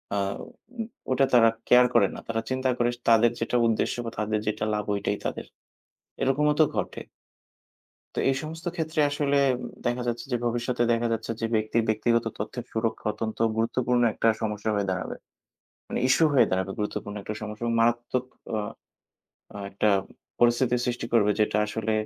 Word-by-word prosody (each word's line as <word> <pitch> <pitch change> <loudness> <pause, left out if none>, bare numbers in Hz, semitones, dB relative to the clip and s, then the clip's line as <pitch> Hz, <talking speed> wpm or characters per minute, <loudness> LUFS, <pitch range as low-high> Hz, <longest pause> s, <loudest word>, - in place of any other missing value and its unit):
আ - - 0 0.3
উ 240 -3 -9 0.3
ওটা 135 +1 +4
তারা 115 -2 +7 0.2
কেয়ার 125 0 +7
করে 105 -5 +5
না। - - -6
তারা 115 -1 -1
চিন্তা 130 0 0
করে 120 0 +2 0.2
তাদের 115 +1 +6
যেটা 115 +2 -1
উদ্দেশ্য 110 - +1
বা 115 - -4
তাদের 105 0 0
যেটা 105 0 -1
লাভ 105 -1 -1
ওটাই 100 0 -1
তাদের। - - -3 0.8
এরকমও 150 +3 +3
তো - - +8
ঘটে - - -3 1.2
তো - - +1
এই 135 - 0
সমস্ত 165 +2 -8
ক্ষেত্রে 160 -1 -1
আসলে 145 -1 0 0.2
উ 125 - -6 0.2
দেখা 120 +1 0
যাচ্ছে 120 0 -2
যে - - +3
ভবিষ্যতে 120 +1 0
দেখা 115 0 +1
যাচ্ছে 115 - -3
যে, 115 - 0
ব্যক্তির 110 +1 +1
ব্যক্তিগত 115 +2 +2
তথ্যের 115 +4 -5
সুরক্ষা 110 -1 -2
অত্যন্ত 110 -1 -4 0.2
গুরুত্বপূর্ণ 120 +2 +1
একটা 115 - +1
সমস্যা 105 0 -1
হয়ে 100 -1 0
দাঁড়াবে। 95 0 -3 0.7
মানে - - -2
ইশ্যু 160 - +5
হয়ে 130 - +6
দাঁড়াবে 95 +1 0
গুরুত্বপূর্ণ 105 0 -3
একটা 105 - -5
সমস্যা 105 +2 -7
এবং 115 0 0
মারাত্মক 120 +2 +1 0.3
অ - - 0 1.0
আ - - -6
একটা 105 +2 +1 0.5
পরিস্থিতি 120 +1 +3
সৃষ্টি 120 -1 -2
করবে 105 -3 +4
যেটা 105 0 +2
আসলে 110 0 -2
115 Hz, 170 wpm, -26 LUFS, 110-125 Hz, 1.2 s, তো